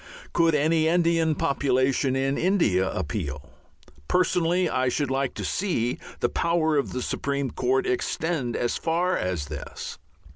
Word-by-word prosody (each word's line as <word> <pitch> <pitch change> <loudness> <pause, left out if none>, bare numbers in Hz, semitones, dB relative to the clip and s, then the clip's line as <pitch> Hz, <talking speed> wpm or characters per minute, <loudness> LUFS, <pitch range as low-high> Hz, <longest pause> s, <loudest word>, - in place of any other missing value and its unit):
Could 165 -2 +3
any 160 +2 +2
Indian 165 -2 +2
population 135 -1 +1
in 135 +1 +1
India 140 - +2
appeal? 75 -5 -4 0.6
Personally 180 0 +2
I 130 0 +1
should 140 +1 -1
like 135 -1 -1
to - - -4
see 160 - -1 0.2
the - - +3
power 165 +1 +1
of 140 - 0
the 125 - -3
Supreme 140 -1 -2
Court 390 0 +1
extend 165 - -1
as 120 - 0
far 175 +3 0
as 90 -5 -2
this. 75 +1 -7
145 Hz, 140 wpm, -25 LUFS, 125-170 Hz, 0.6 s, Could